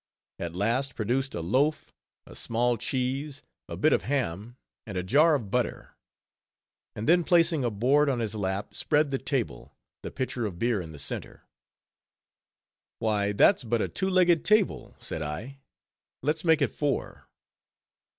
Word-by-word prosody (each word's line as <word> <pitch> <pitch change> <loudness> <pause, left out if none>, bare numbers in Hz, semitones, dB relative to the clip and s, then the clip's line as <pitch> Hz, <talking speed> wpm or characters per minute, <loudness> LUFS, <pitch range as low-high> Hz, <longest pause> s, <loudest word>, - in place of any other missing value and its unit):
_ - - -4
at 85 0 -5
last 120 +7 0
produced 130 +5 -1
a 85 - -3
loaf, 130 - 0 0.3
a - - -13
small 120 +1 0
cheese, 135 +4 -3 0.3
a - - -5
bit 155 - +3
of - - +2
ham, 120 -4 -3 0.3
and 100 -3 -5
a 90 - -1
jar 150 - +4
of 110 -8 -4
butter. - - -2 1.0
And 105 - -4
then 175 +2 +5
placing 165 -4 +3
a 120 - +1
board 135 +8 +2
on 130 - 0
his 110 -3 -2
lap, 100 -1 -3
spread 150 -1 +1
the 135 - -1
table, 130 - -3 0.3
the - - -6
pitcher 130 -3 -3
of 90 -4 -7
beer 115 0 0
in 80 -2 -8
the 75 - -10
center. 70 - -5 1.5
"Why 105 -2 0
that's 130 - +4
but 120 0 0
a - - 0
two 190 - -2
legged 180 -3 +4
table," 215 -2 +1
said 80 - -6
I, 90 - -6 0.6
"let's 155 +3 0
make 160 -3 +4
it - - 0
four." 145 -2 -3
125 Hz, 160 wpm, -27 LUFS, 105-150 Hz, 1.5 s, then